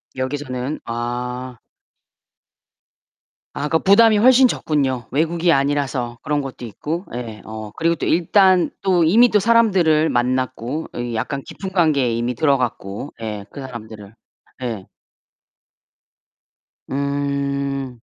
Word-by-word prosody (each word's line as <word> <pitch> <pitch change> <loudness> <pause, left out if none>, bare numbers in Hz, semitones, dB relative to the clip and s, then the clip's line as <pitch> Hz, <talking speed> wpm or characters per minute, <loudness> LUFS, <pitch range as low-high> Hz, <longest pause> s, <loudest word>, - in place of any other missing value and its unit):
여기서는 130 +1 -3
아. 125 +2 -4 2.0
아 145 - -2
그러니까 160 +1 +2
부담이 215 +2 +5
훨씬 255 +4 +6
적군요. 135 - -1
외국이 165 +4 +1
아니라서 135 -4 0
그런 145 0 0
것도 135 -2 -8
있고. 160 - -5
예. 115 -3 -6
어 110 -1 -7
그리고 165 +1 +1
또 - - -4
일단 185 +2 +4
또 185 -3 +3
이미 225 +10 +6
또 210 - +3
사람들을 190 -8 +3
만났고 130 +3 -1
이 120 -1 -3
약간 140 +5 -3
깊은 190 -1 -7
관계에 150 -9 +2
이미 120 +2 -1
들어갔고. 130 -5 -1
예. 105 -2 -5
그 140 - -9
사람들을. 110 -5 -9 0.5
예. 110 -6 -4 2.0
음. 140 -2 -2
140 Hz, 240 characters per minute, -20 LUFS, 120-165 Hz, 2.0 s, 훨씬